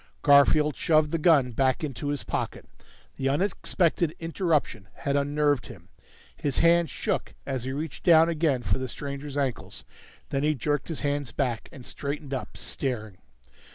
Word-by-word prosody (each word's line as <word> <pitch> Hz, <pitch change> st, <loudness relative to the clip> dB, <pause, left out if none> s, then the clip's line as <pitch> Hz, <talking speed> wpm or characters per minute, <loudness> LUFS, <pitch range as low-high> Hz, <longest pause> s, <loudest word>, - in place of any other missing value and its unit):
Garfield 145 Hz, +1 st, +5 dB
shoved 155 Hz, -2 st, +2 dB
the 165 Hz, -, 0 dB
gun 150 Hz, -6 st, +4 dB
back 130 Hz, +4 st, +1 dB
into 145 Hz, -1 st, -4 dB
his 145 Hz, -1 st, -2 dB
pocket. -, -, -4 dB, 0.5 s
The 135 Hz, -, 0 dB
unexpected 170 Hz, 0 st, +1 dB
interruption 165 Hz, -, -1 dB
had 140 Hz, 0 st, -2 dB
unnerved 145 Hz, -1 st, +1 dB
him; 95 Hz, -9 st, -13 dB, 0.5 s
his 140 Hz, -2 st, -2 dB
hands 170 Hz, 0 st, +4 dB
shook -, -, -3 dB
as 130 Hz, -3 st, -3 dB
he 130 Hz, -, -3 dB
reached 150 Hz, +1 st, -5 dB
down 165 Hz, -2 st, +6 dB
again 155 Hz, -6 st, +1 dB
for 95 Hz, +1 st, 0 dB
the 130 Hz, -, -3 dB
stranger's 140 Hz, +2 st, -6 dB
ankles. 130 Hz, -, -3 dB, 0.5 s
Then 135 Hz, -, 0 dB
he 150 Hz, +1 st, +2 dB
jerked 145 Hz, +3 st, -1 dB
his 165 Hz, -, -4 dB
hands 145 Hz, -3 st, -1 dB
back, 120 Hz, -2 st, -2 dB
and 135 Hz, -7 st, -12 dB
straightened 140 Hz, 0 st, -5 dB
up, 130 Hz, -, -5 dB
staring. 120 Hz, -6 st, -4 dB
145 Hz, 155 wpm, -27 LUFS, 130-155 Hz, 0.5 s, down